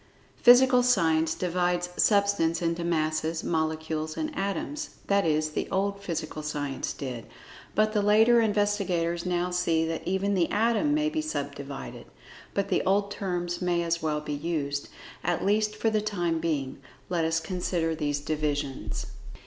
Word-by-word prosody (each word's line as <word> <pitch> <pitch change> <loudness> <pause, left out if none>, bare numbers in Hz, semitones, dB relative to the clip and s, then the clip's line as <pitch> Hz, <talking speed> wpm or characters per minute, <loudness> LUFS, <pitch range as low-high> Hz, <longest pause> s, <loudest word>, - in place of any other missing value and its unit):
Physical 250 +1 +7
Science 165 -9 +2
divides 180 0 0
Substance 200 -6 +3
into 170 0 -1
Masses, 160 -1 0
Molecules, 160 -1 -2
and 310 -1 -3
Atoms—that 200 - -2
is, 155 0 +1
the - - -3
old 200 +1 -1
Physical 160 -4 -4
Science 145 -2 -3
did, 125 -5 -6 0.5
but 215 0 +2
the 210 - +2
later 220 +3 +5
investigators 200 -5 0
now 180 0 0
see 170 -2 +1
that 165 0 -3
even 190 +2 0
the 180 -3 +2
Atom 235 +7 +2
may 305 0 +1
be 315 0 -1
sub 145 - -3
divided. 140 -1 -8 0.5
But 200 - 0
the - - +2
old 200 +1 +1
terms 175 -3 -3
may 175 -1 +1
as 170 0 -1
well 150 -1 -1
be 150 0 -4
used, 145 -2 -2 0.3
at 175 -1 0
least 210 +1 +2
for 220 +1 0
the 215 -1 +1
time 175 -6 -1
being. 145 -5 -2 0.3
Let 175 -2 0
us 160 0 +1
consider 170 -1 -1
these 145 -2 -2
divisions. 145 -2 -2
175 Hz, 150 wpm, -27 LUFS, 160-200 Hz, 0.5 s, Physical